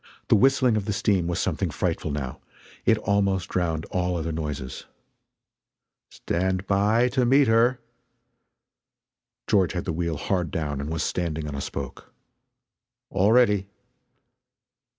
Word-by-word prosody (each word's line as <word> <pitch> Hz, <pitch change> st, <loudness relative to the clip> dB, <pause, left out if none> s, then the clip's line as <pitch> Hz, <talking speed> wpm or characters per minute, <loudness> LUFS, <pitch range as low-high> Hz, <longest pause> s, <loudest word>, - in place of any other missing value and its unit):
The -, -, +6 dB
whistling 130 Hz, -1 st, +4 dB
of 100 Hz, -, -2 dB
the 105 Hz, -, -1 dB
steam 100 Hz, -3 st, +1 dB
was 85 Hz, -, -1 dB
something -, -, -1 dB
frightful -, -, -2 dB
now 70 Hz, -3 st, -4 dB, 0.5 s
it 110 Hz, -, +5 dB
almost 100 Hz, -3 st, 0 dB
drowned 80 Hz, -3 st, -1 dB
all 90 Hz, -1 st, 0 dB
other 80 Hz, 0 st, -3 dB
noises. 75 Hz, -5 st, -5 dB, 1.2 s
"Stand 95 Hz, +2 st, -2 dB
by 105 Hz, +5 st, +3 dB
to 130 Hz, 0 st, +1 dB
meet 135 Hz, +2 st, +4 dB
her!" 115 Hz, +3 st, +3 dB, 1.7 s
George 95 Hz, -4 st, +2 dB
had 90 Hz, -, -3 dB
the 85 Hz, -, -2 dB
wheel 85 Hz, -1 st, -2 dB
hard 90 Hz, +1 st, -1 dB
down 75 Hz, -4 st, -3 dB
and 70 Hz, -, -4 dB
was 80 Hz, 0 st, -2 dB
standing 80 Hz, -3 st, -2 dB
on 75 Hz, -, -5 dB
a 70 Hz, -, -4 dB
spoke. 70 Hz, -2 st, -7 dB, 1.0 s
"All 100 Hz, +3 st, +3 dB
ready!" 105 Hz, -5 st, +4 dB
95 Hz, 135 wpm, -25 LUFS, 80-105 Hz, 1.7 s, The